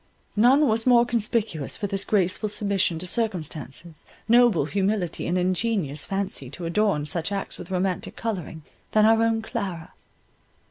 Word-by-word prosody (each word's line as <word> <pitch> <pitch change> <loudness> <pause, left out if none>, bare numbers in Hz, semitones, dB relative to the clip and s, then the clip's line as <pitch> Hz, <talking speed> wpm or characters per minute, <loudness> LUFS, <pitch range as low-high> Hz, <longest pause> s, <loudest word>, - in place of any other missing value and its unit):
None 260 +7 +5
was 225 +1 0
more 240 -1 +6
conspicuous 220 - -1
for 210 - -3
this 195 0 -2
graceful 200 +1 +1
submission 200 -4 0
to 175 - -5
circumstances, 170 - -3 0.2
noble 235 - +5
humility, 195 0 -1
and 175 +2 0
ingenious 180 -5 0
fancy 195 -9 -3
to 170 +5 -7
adorn 170 -3 +1
such 160 +5 -2
acts 200 -1 -4
with 175 - -9
romantic 185 0 -2
colouring, 180 -8 -5 0.3
than 215 0 +5
our 225 +1 +5
own 225 -1 +1
Clara. 190 -8 -5
195 Hz, 145 wpm, -25 LUFS, 170-225 Hz, 0.3 s, more